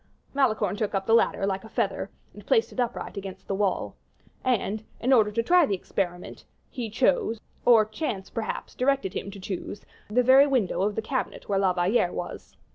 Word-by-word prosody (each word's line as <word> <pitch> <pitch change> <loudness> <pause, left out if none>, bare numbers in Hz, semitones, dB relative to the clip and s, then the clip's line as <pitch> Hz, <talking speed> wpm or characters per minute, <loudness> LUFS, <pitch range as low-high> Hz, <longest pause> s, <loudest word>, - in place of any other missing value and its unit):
Malicorne 260 -7 +1
took 210 -1 -2
up 195 0 -1
the 225 - +2
ladder, 230 -3 +3
like 195 -1 -2
a 220 - -11
feather, - - -1 0.2
and - - -13
placed 450 -2 +2
it - - -8
upright 240 -3 -2
against 195 -1 -7
the - - -2
wall. 195 -1 -1 0.5
And, 220 -4 0 0.2
in 260 +3 +2
order 220 -4 +5
to 230 +2 0
try 350 +3 +5
the 200 - 0
experiment, 180 -1 -4 0.3
he 245 -5 -4
chose, 230 - +1 0.3
or 225 -3 +7
chance, 215 -4 -4
perhaps, 225 -1 -4
directed 265 -6 0
him - - -4
to 200 0 -9
choose, 195 +1 -6 0.2
the 250 +4 +3
very 265 +3 +7
window 250 -10 +1
of 205 +1 0
the 220 - -2
cabinet 260 +3 -3
where 195 -1 +1
La 190 -1 +3
Valliere 180 +1 +2
was. 175 - -7
215 Hz, 195 wpm, -26 LUFS, 195-250 Hz, 0.5 s, or